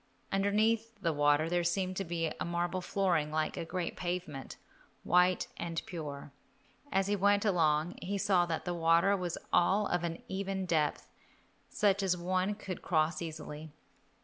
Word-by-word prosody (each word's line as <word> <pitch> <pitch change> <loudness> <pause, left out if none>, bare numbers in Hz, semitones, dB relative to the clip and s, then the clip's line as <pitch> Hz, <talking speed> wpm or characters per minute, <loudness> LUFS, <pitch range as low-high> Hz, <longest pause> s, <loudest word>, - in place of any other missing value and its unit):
Underneath 215 +3 +1
the 170 -4 0
water 145 +1 +3
there 175 +1 +1
seemed 185 +2 0
to 195 - -1
be 165 -2 -2
a - - -1
marble 175 +1 -1
flooring 175 -5 +1
like 155 0 -1
a - - -3
great 175 +1 -3
pavement, 175 -6 -4 0.5
white 180 +1 +3
and 165 -1 -3
pure. 150 -5 -6 0.6
As 195 0 +2
he 205 +1 +1
went 205 +1 +3
along 165 -3 +2
he 200 +2 -2
saw 185 -3 +3
that 165 -1 -3
the 175 - -1
water 170 +3 +4
was 180 -3 -3 0.2
all 195 +4 +4
of 175 -3 0
an 165 -1 -4
even 190 0 -3
depth, 155 -4 0 0.6
such 200 -1 +2
as 185 -2 +1
one 185 +3 0
could 190 -3 -6
cross 155 -1 +1
easily. 155 -1 -6
175 Hz, 160 wpm, -32 LUFS, 165-195 Hz, 0.6 s, water